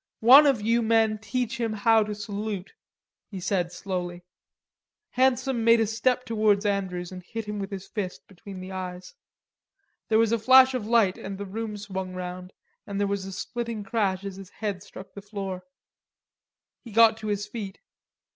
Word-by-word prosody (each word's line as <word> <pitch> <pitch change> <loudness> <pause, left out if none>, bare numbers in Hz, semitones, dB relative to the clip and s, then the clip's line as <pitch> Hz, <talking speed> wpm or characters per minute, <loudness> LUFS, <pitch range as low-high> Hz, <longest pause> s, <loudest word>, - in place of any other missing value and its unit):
"One 270 +6 +9
of 250 -7 +2
you 230 +2 +2
men 220 -1 +2
teach 250 +3 -3
him 225 -2 -1
to 220 -2 +4
salute," 205 -1 -5 0.6
he 195 - -6
said 180 -1 -1
slowly. 175 -1 -5 0.9
Handsome 255 -1 +1
made 230 0 +6
a 225 - +3
step 250 +4 0
towards 215 -3 +2
Andrews 190 -3 -2
and 185 -1 -8
hit 225 +5 -6
him 210 0 -4
with 195 -1 -4
his 195 -1 -7
fist 190 -4 -5
between 195 0 -10
the 185 +1 -8
eyes. 185 -1 -6 1.0
There 220 - +4
was 225 -1 +3
a 230 - +2
flash 260 +3 +7
of 235 -5 -3
light 225 -5 +3
and 195 0 -6
the 200 - -5
room 210 +2 -5
swung 190 -2 -5
round, 180 0 -6 0.4
and 200 0 -4
there 205 - +2
was 200 -1 -2
a 195 - -6
splitting 230 +2 -4
crash 195 -2 -1
as 195 -1 -6
his 195 -2 -10
head 205 -3 -4
struck 190 +1 -12
the 200 - -9
floor. 195 -2 -6 1.2
He 235 - -12
got 225 +1 +6
to 220 -1 -7
his 205 -1 -1
feet. 205 -2 -7
205 Hz, 175 wpm, -26 LUFS, 190-225 Hz, 1.2 s, One